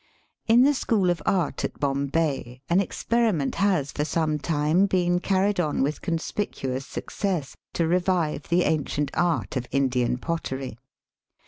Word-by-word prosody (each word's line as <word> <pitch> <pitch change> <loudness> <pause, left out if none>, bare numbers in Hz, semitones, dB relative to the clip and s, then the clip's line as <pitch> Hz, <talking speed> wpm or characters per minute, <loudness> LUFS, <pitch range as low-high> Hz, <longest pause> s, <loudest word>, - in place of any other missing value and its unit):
In 235 +2 +6
the 290 +2 +5
School 205 -9 +1
of 170 -3 -3
Art 180 -6 0
at - - -4
Bombay 140 -2 -1
an 180 +3 +5
ex 200 - -6
periment 220 - +1
has 180 -9 +2
for 150 - -2
some 155 -1 0
time 155 +5 +2
been 175 -2 +2
carried 195 +1 +1
on 150 -5 +1
with 145 +3 -2
conspicuous 160 -6 -3
success 180 -9 -3 0.2
to 170 - +1
revive 175 -4 0
the 175 +1 +3
ancient 150 -1 0
art 170 -4 0
of 125 -1 -2
Indian 125 -3 +1
pottery. 130 -6 -4
165 Hz, 145 wpm, -25 LUFS, 140-185 Hz, 0.2 s, In